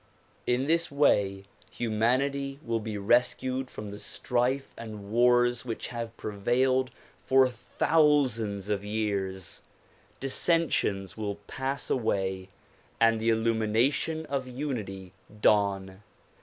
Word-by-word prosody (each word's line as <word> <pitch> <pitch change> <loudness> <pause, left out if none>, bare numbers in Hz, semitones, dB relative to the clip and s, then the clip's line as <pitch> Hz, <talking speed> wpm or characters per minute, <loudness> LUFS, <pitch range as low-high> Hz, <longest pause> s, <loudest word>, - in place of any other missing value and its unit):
In 125 +2 +2
this 165 +3 +2
way 100 -9 +2 0.3
humanity 130 +5 0
will 115 -1 0
be 110 -1 -4
rescued 125 +4 +1
from 105 -1 -7
the 105 - -8
strife 125 +5 -1
and 105 -3 -8
wars 120 +1 +4
which 115 -3 -5
have 115 -2 -6
prevailed 125 +5 +1 0.3
for 130 0 +5
thousands 125 -5 +1
of 100 -1 -1
years; 100 -3 -2 0.6
dissensions 135 - +1
will 105 -2 -3
pass 135 +4 -3
away 95 -5 -1 0.5
and 115 -1 +4
the 115 - +2
illumination 115 +8 +1
of 140 -3 -3
unity 110 -9 -5 0.3
dawn. 100 -2 +2
115 Hz, 105 wpm, -28 LUFS, 105-130 Hz, 0.6 s, for